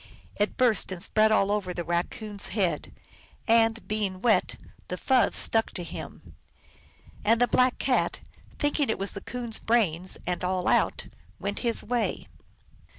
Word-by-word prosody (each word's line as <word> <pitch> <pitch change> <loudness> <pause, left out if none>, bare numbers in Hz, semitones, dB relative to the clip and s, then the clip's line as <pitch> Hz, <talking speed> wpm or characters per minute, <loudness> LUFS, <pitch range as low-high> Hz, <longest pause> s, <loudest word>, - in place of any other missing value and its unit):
It 205 0 -1
burst 240 -7 +3
and 185 - -5
spread 215 +1 +3
all 200 -2 +3
over 190 -4 -2
the 175 - -3
Raccoon 200 +5 -3
s - - +2
head, 190 -5 -1 0.6
and, 225 0 +3
being 205 -3 -2
wet, 225 +2 +2 0.3
the - - -4
fuzz 260 -2 +3
stuck 225 0 +2
to 180 - -4
him. - - -9 0.9
And 225 +2 +3
the 245 - +4
Black 250 +2 +3
Cat, 260 -2 +1 0.4
thinking 290 -2 0
it - - 0
was 195 +1 0
the 200 - -7
Coon 245 -1 -6
s 225 - +2
brains 185 -6 0
and 180 0 -2
all 185 0 -1
out, - - +2 0.3
went 200 +1 -3
his 235 -2 +1
way. 240 +1 -1
215 Hz, 160 wpm, -27 LUFS, 190-235 Hz, 0.9 s, the